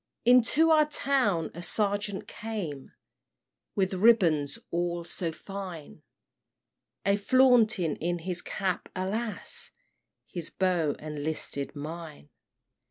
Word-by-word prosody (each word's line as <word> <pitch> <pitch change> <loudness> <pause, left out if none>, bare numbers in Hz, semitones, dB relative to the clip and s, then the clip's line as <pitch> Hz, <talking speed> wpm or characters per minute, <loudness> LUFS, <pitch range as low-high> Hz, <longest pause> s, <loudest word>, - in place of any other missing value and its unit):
"Into 255 +7 +5
our 305 -1 +5
town 260 - +1
a 175 - -7
sergeant 205 +2 -1
came, 185 -12 -6 0.8
With 190 -1 +1
ribands 180 -9 +4
all 175 0 -1
so 170 0 -3
fine, 180 - -8 1.0
A 200 0 +4
flaunting 220 - +4
in 175 +2 -1
his 175 +1 -4
cap 190 -2 -2
alas! 210 +4 -2 0.6
His 170 -3 -5
bow 175 -6 +1
enlisted 150 -2 -3
mine! 150 - -8
185 Hz, 100 wpm, -28 LUFS, 165-220 Hz, 1.0 s, Into